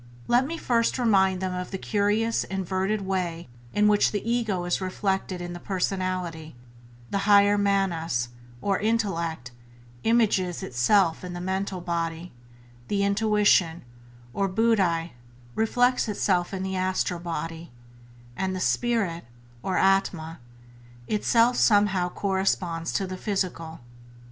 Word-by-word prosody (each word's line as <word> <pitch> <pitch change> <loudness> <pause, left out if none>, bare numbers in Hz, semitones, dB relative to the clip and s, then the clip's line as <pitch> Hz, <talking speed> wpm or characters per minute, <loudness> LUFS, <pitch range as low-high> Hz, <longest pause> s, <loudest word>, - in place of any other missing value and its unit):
Let 245 +3 +3
me 330 +2 -4
first 235 -5 +1
remind 190 -6 +3
them 185 -1 -2
of 180 0 -4
the 190 - -4
curious 210 +3 0
inverted 190 +2 -2
way 180 -5 -3 0.2
in 210 0 +3
which 210 -1 +4
the 210 +1 -3
ego 220 -7 0
is 175 +2 -1
reflected 190 -1 -2
in 175 0 -6
the 175 - -7
personality; 185 - -3 0.6
the 200 - 0
higher 205 0 +6
manas, 175 -11 0 0.3
or 195 -1 +1
intellect, 170 - -1 0.5
images 205 -6 +2
itself 160 - +2
in 180 -1 -6
the 175 - -5
mental 190 0 -3
body, 170 0 -3 0.6
the 200 -1 0
intuition, 200 -5 +2 0.5
or 195 - 0
buddhi, 185 - +1 0.4
reflects 245 +3 +2
itself 185 -4 0
in 190 -1 -4
the 190 0 -3
astral 185 -1 -1
body, 165 -1 -5 0.6
and 190 +3 -2
the - - -3
spirit, 200 - 0 0.4
or 190 +5 -1
atma, 180 -4 +1 0.7
itself 230 +3 +2
somehow 205 -4 +3
corresponds 185 -4 -1
to 195 - 0
the 185 0 -6
physical. 180 - -3
190 Hz, 125 wpm, -26 LUFS, 175-205 Hz, 0.7 s, higher